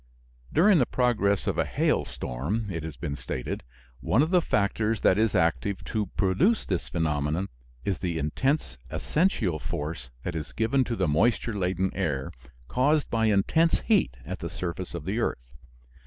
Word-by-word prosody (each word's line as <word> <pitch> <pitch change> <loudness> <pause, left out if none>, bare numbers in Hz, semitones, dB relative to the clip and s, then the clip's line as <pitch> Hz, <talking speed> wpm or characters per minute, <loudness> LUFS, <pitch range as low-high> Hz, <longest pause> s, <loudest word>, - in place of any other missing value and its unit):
During 185 +2 +5
the 125 - +3
progress 105 -6 +1
of - - -1
a - - +4
hailstorm, 95 - -1
it 85 -2 -3
has 80 -1 -7
been 75 -4 -3
stated, 65 -3 -4 0.4
one 125 - +3
of 160 - -1
the 180 -2 +5
factors 105 - 0
that 95 - +4
is 110 -2 +2
active 95 +3 +1
to 105 -2 -2
produce 175 - +2
this 90 -4 -2
phenomenon 80 +2 0 0.4
is 95 -3 -1
the 85 -3 -2
intense 75 - -1
ascensional 120 - 0
force 75 -1 -4
that 90 - -3
is 80 -2 -5
given 125 +4 +2
to 115 - -2
the 95 -4 +1
moisture 110 +9 +2
laden 95 -1 0
air, 75 -8 -2 0.4
caused 145 - +2
by 115 -1 +2
intense 135 +12 +3
heat 195 - +2
at - - -5
the - - -4
surface 90 0 -5
of 80 -3 -6
the 100 +5 -1
earth. - - -2
95 Hz, 165 wpm, -27 LUFS, 80-120 Hz, 0.4 s, During